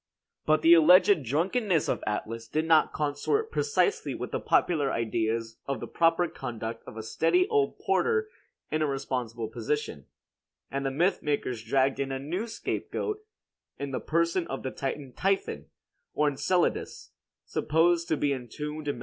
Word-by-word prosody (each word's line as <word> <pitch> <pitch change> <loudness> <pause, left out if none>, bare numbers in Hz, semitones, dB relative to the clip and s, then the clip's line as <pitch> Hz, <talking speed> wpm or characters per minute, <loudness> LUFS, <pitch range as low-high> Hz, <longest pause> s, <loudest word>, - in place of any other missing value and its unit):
But 155 0 +3
the 165 - +8
alleged 180 +3 +7
drunkenness 170 - +1
of - - -1
Atlas 115 +2 -3
did 155 +6 -1
not 160 -1 +4
consort 155 - -1
precisely 445 -1 +1
with - - -5
the - - -1
popular 145 -6 +2
ideas 115 0 -1
of 135 -4 -2
the - - -5
proper 165 +1 +2
conduct 115 -5 -6
of 115 - -9
a 110 - -5
steady 355 - +2
old 425 -2 +1
porter 445 -1 +1 0.4
in 155 - 0
a 155 - +2
responsible 125 -4 -3
position; 115 - -3 0.6
and 140 0 -2
the 135 - 0
mythmakers 145 - 0
dragged 135 +3 +1
in 135 -1 -1
a 135 - -2
new 170 - -3
scapegoat 420 - -3 0.6
in 140 -1 -4
the 130 - -2
person 170 +2 0
of 135 - -5
the 130 - -3
Titan 135 -1 -4
Typhon, 195 +1 -1 0.5
or 150 - +3
Enceladus, 170 +5 0 0.3
supposed 170 +2 +2
to 155 - +1
be 145 -1 +1
entombed 150 +4 -6
in 145 - -1
Mt. - - -9
150 Hz, 160 wpm, -28 LUFS, 130-175 Hz, 0.6 s, the